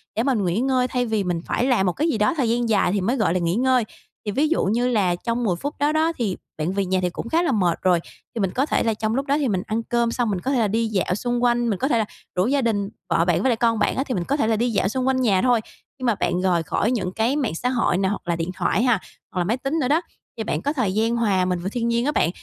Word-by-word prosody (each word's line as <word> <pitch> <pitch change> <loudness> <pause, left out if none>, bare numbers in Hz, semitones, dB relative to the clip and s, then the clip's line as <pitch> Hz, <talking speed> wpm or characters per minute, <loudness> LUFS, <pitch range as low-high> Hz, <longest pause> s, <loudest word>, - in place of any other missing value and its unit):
để 225 - +1
mà 270 +1 +2
nghỉ 195 -3 0
ngơi 255 0 +1
thay 250 -1 -1
vì 220 -3 0
mình 175 -2 -2
phải 245 - 0
làm 250 -7 +2
một 180 - +1
cái 315 +3 0
gì 235 - 0
đó 210 0 +2
thời 245 -5 +1
gian 235 0 0
dài 205 -4 +3
thì 200 0 0
mới 230 +8 +1
gọi 215 -7 +2
là 185 - +1
nghỉ 170 +1 0
ngơi. 255 +1 +3 0.4
Thì 205 - -1
ví 290 +8 +2
dụ 335 - +1
như 235 +5 +1
là 200 -7 +2
trong 235 +6 -2
10 185 -5 +1
phút 285 - -4
đó 290 +1 +2
đó, 315 +1 +2
thì 210 -7 -1 0.2
bạn 160 +4 -1
về 200 0 0
nhà 185 0 +1
thì 180 - 0
cũng 220 - -6
khá 330 +5 +2
là 310 - +1
mệt 180 -8 +1
rồi, 180 -2 +3 0.4
thì - - -2
mình 190 -2 0
có 265 +7 +1
thể - - 0
là 225 -1 +1
trong 215 +1 -2
lúc 275 +1 -1
đó 280 +1 +1
thì 285 - 0
mình 190 -5 0
ăn 225 +1 -1
cơm 235 0 0
xong 240 -1 0
mình 195 -3 -1
có 265 - -1
thể 265 - +2
là 220 - +2
đi 225 +3 0
dạo 190 -3 0
xung 240 +3 -2
quanh, 240 -1 +2
mình 200 -4 -1
có 270 - +1
thể 245 - +2
là 220 - +1 0.3
rủ 180 +4 +2
gia 275 +2 +2
đình, 205 -5 0 0.2
vợ 165 0 +2
bạn 175 -2 +2
với 265 - +2
lại 240 - +3
con 230 -1 +1
bạn - - +1
á, 265 - 0
thì 270 - -4
mình 180 - -1
có 280 - -1
thể 220 - +1
là 225 - +2
đi 240 +3 +1
dạo 200 -3 +1
xung 260 +3 -1
quanh 260 -1 +2
nhà 200 -7 +3
thôi. 245 -3 +3 0.4
Nhưng 255 - -4
mà 235 -3 +3
bạn 175 -1 -1
rời 180 -3 +2
khỏi 210 +8 0
những 190 -8 -1
cái 230 +6 +1
mạng 265 - -1
xã 250 +9 -1
hội 235 -8 +1
nè, 190 0 +1
hoặc 200 - -5
là 170 - +1
điện 165 +2 -3
thoại 200 +6 +1
ha, 245 -5 +3 0.3
hoặc 185 - -3
là 175 - +2
máy 220 +7 0
tính 275 +5 -2
nữa 255 - +1
đó, 310 +4 +3 0.4
thì 220 - -2
bạn - - -2
có 285 - -1
thời 220 -10 0
gian 225 +2 +1
hòa 200 -6 +2
mình 180 -1 -1
vào 180 +2 -3
thiên 235 0 -1
nhiên 235 +2 +1
á 295 - +2
bạn. 170 - +2
225 Hz, 325 wpm, -23 LUFS, 190-250 Hz, 0.4 s, dài